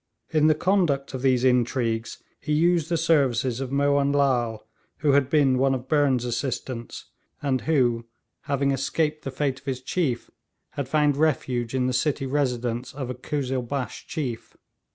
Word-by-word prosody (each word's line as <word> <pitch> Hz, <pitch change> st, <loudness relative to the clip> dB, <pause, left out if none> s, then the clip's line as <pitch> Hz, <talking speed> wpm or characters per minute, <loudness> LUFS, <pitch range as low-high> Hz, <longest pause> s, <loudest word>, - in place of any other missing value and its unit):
In 155 Hz, -1 st, +4 dB
the 155 Hz, -, +4 dB
conduct 165 Hz, -7 st, +1 dB
of 130 Hz, -, -4 dB
these 130 Hz, -2 st, +2 dB
intrigues 120 Hz, -2 st, 0 dB, 0.2 s
he 150 Hz, -, -2 dB
used 165 Hz, +1 st, +2 dB
the 170 Hz, -, +1 dB
services 135 Hz, -7 st, +2 dB
of 135 Hz, -1 st, -4 dB
Mohun 140 Hz, 0 st, +2 dB
Lal, 120 Hz, -6 st, +1 dB, 0.4 s
who 145 Hz, -, +3 dB
had 140 Hz, -1 st, +3 dB
been 140 Hz, -4 st, +3 dB
one 135 Hz, 0 st, +3 dB
of 130 Hz, 0 st, -6 dB
Burnes' 140 Hz, -5 st, +2 dB
assistants, 120 Hz, -1 st, -4 dB, 0.3 s
and 135 Hz, -3 st, 0 dB
who, 120 Hz, -7 st, +1 dB, 0.4 s
having 140 Hz, 0 st, +1 dB
escaped 150 Hz, +3 st, -1 dB
the -, -, -3 dB
fate 135 Hz, -1 st, -2 dB
of 130 Hz, -, -28 dB
his 130 Hz, -2 st, -2 dB
chief, 130 Hz, -2 st, -2 dB, 0.4 s
had 140 Hz, -3 st, -4 dB
found 150 Hz, -1 st, +2 dB
refuge 130 Hz, -5 st, 0 dB
in 130 Hz, -1 st, +1 dB
the 130 Hz, -, 0 dB
city 135 Hz, +2 st, 0 dB
residence 125 Hz, -3 st, -1 dB
of 130 Hz, -3 st, -4 dB
a -, -, -3 dB
Kuzzilbash 130 Hz, -1 st, -3 dB
chief. 130 Hz, -8 st, -5 dB
135 Hz, 160 wpm, -25 LUFS, 125-145 Hz, 0.4 s, In